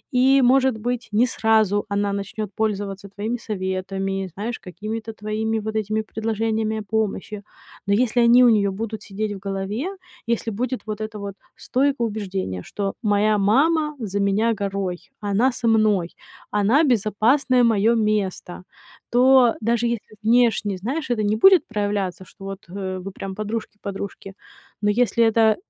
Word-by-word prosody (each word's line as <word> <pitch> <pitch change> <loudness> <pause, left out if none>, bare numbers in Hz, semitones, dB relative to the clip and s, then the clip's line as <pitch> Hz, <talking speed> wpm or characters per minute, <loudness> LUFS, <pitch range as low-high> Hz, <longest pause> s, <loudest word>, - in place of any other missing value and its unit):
И 265 +2 +5
может 260 0 +4
быть, 240 +2 -3
не 230 +4 +3
сразу 220 -3 +2
она 200 0 0
начнёт 200 +2 -4
пользоваться 200 -2 -2
твоими 215 +5 -3
советами, 195 -1 -3
знаешь, 225 +5 -4
какими-то 215 +5 -6
твоими 220 +1 -2
вот 220 +1 -5
этими 215 0 -1
предложениями 220 0 -1
о 215 - -6
помощи. 210 -1 -2 0.5
Но 200 - +2
если 240 0 +2
они 245 +2 +7
у 245 - +7
неё 200 -3 +3
будут 220 +2 -5
сидеть 205 +1 -4
в 195 - -8
голове, 195 - -3 0.4
если 230 -1 0
будет 250 +4 -2
вот 215 0 -4
это 215 -1 -5
вот 200 -1 -6 0.2
стойкое 265 -2 0
убеждение, 190 - -4
что 195 -1 -3
моя 210 0 +3
мама 300 +9 +2
за 200 -3 -3
меня 205 +4 +2
горой, 195 -3 -3
она 205 +6 +2
со 240 -1 -3
мной, 215 -6 +3 0.4
она 215 +10 +3
безопасное 245 +2 +2
моё 225 0 +3 0.3
место, 180 -1 -8 0.5
то 250 -1 +5
даже 235 +1 +1
если 230 -2 -5
внешне, 225 -4 +2
знаешь, 260 - -3
это 215 -3 0
не 215 - +2
будет 380 - +6
проявляться, 205 -4 -2
что 195 - -16
вот, 195 -2 -8
э, 185 -1 -4
вы 195 - -6
прям 190 0 -7
подружки-подружки, 205 -2 -6 0.5
но 210 - +2
если 235 -1 +2
это, 220 -1 +4
215 Hz, 150 wpm, -22 LUFS, 200-235 Hz, 0.5 s, они